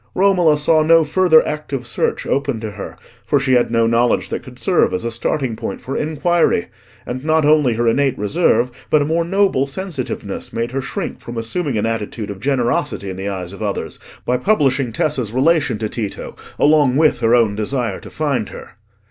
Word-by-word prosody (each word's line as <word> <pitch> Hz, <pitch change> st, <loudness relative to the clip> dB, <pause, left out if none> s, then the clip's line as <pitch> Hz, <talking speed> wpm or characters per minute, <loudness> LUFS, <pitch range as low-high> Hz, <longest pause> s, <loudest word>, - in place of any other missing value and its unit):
Romola 180 Hz, -5 st, +4 dB
saw 155 Hz, +2 st, +3 dB
no 165 Hz, +1 st, +5 dB
further 160 Hz, +1 st, +4 dB
active 145 Hz, -4 st, -4 dB
search 120 Hz, -, -1 dB
open 140 Hz, -4 st, -1 dB
to 110 Hz, -1 st, -5 dB
her; 100 Hz, -1 st, -8 dB, 0.3 s
for 145 Hz, -, +1 dB
she 130 Hz, -1 st, +1 dB
had 125 Hz, -1 st, +3 dB
no 115 Hz, 0 st, +2 dB
knowledge 115 Hz, +1 st, +1 dB
that -, -, -3 dB
could -, -, -13 dB
serve -, -, +2 dB
as 90 Hz, -, -3 dB
a 115 Hz, -, -2 dB
starting 120 Hz, +1 st, -1 dB
point 115 Hz, +1 st, -5 dB
for 135 Hz, -, -6 dB
inquiry, 160 Hz, -, +1 dB, 0.4 s
and 130 Hz, +2 st, -5 dB
not 155 Hz, 0 st, +2 dB
only 150 Hz, -6 st, +4 dB
her 120 Hz, +1 st, 0 dB
innate 135 Hz, +3 st, +2 dB
reserve 120 Hz, -, +1 dB, 0.2 s
but 150 Hz, -1 st, +3 dB
a -, -, -2 dB
more 165 Hz, +3 st, +1 dB
noble 190 Hz, -6 st, +1 dB
sensitiveness 135 Hz, -, -5 dB
made 115 Hz, +1 st, -3 dB
her 135 Hz, +1 st, -2 dB
shrink 175 Hz, +7 st, -5 dB
from 120 Hz, 0 st, -8 dB
assuming 125 Hz, +3 st, -2 dB
an 105 Hz, -, 0 dB
attitude 110 Hz, -1 st, -3 dB
of 100 Hz, -, -8 dB
generosity 120 Hz, -5 st, -1 dB
in -, -, -6 dB
the 95 Hz, +2 st, -4 dB
eyes 95 Hz, -2 st, -5 dB
of 100 Hz, -, -11 dB
others -, -, -4 dB, 0.3 s
by 125 Hz, -, +1 dB
publishing 135 Hz, -, +1 dB
Tessa's 125 Hz, -3 st, -1 dB
relation 145 Hz, -1 st, +2 dB
to 110 Hz, -, -2 dB
Tito, 105 Hz, -2 st, -5 dB, 0.2 s
along 145 Hz, -3 st, +4 dB
with 155 Hz, 0 st, +3 dB
her 115 Hz, +1 st, +3 dB
own 110 Hz, -4 st, +2 dB
desire 110 Hz, -1 st, -2 dB
to -, -, -11 dB
find 140 Hz, -9 st, -2 dB
her. -, -, -10 dB
130 Hz, 195 wpm, -18 LUFS, 115-155 Hz, 0.4 s, no